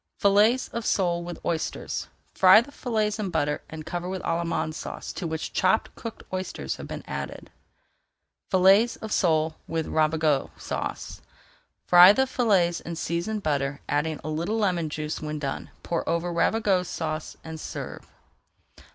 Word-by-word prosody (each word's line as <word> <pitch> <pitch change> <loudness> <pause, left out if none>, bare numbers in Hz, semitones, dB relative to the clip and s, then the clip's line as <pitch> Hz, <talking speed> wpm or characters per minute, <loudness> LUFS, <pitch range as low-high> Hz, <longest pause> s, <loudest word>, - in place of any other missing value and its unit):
FILLETS 210 +6 +4
OF 235 - -4
SOLE 175 -5 +1
WITH 175 0 -8
OYSTERS 160 -2 -2 0.3
Fry 190 +2 +8
the 250 +5 -5
fillets 220 -6 -1
in 205 -3 -2
butter 150 -3 0
and 155 -1 -8
cover 175 +2 -4
with 190 -1 -4
Allemande 165 -1 -1
Sauce - - -6
to 175 - -4
which 160 0 -4
chopped 190 +4 +2
cooked 230 -2 -8
oysters 185 - -3
have - - -8
been - - -6
added. 70 -2 -6 1.0
FILLETS 195 +5 +5
OF 220 - -8
SOLE 160 -4 +2
WITH 165 -1 -2
RAVIGOTE 155 -2 +1
SAUCE - - -5 0.6
Fry 180 +2 +9
the 265 +4 +2
fillets 195 -10 +2
in 170 - -6
seasoned 175 +6 -2
butter, 140 -2 -1
adding 150 +1 0
a 155 - -4
little 170 +8 -1
lemon 180 -7 +1
juice 150 +1 -4
when 155 0 -4
done. 140 -2 -4
Pour 170 - -2
over 170 +1 0
Ravigote 190 0 +2
Sauce 155 -1 -4
and 160 0 -7
serve. - - -7
170 Hz, 150 wpm, -26 LUFS, 155-200 Hz, 1.0 s, Fry